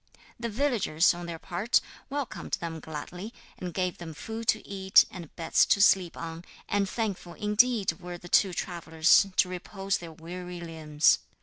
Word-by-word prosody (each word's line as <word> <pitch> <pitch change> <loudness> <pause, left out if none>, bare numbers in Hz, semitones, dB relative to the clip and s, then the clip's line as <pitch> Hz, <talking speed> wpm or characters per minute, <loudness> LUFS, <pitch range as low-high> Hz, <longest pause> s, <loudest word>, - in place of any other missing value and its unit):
The 235 0 -3
villagers, 220 - +2
on 175 0 -7
their 170 -1 -5
part, 180 +8 +1 0.3
welcomed 280 -2 -5
them 165 -1 -3
gladly, 175 +8 -7 0.2
and 180 -1 -4
gave 180 0 -2
them 165 -2 -8
food 225 +7 -6
to - - +1
eat 190 -1 +5
and 175 -7 -10
beds 165 -2 +3
to - - +3
sleep 190 -4 +4
on, 165 0 -6 0.2
and 200 -1 0
thankful 200 -6 -3
indeed 210 0 +2
were 175 -1 -7
the 175 - -12
two 190 +2 +4
travellers 165 +1 +3
to - - +4
repose 195 +2 -3
their 170 -1 -9
weary 175 +2 -8
limbs. 160 -3 +2
180 Hz, 165 wpm, -28 LUFS, 165-205 Hz, 0.3 s, eat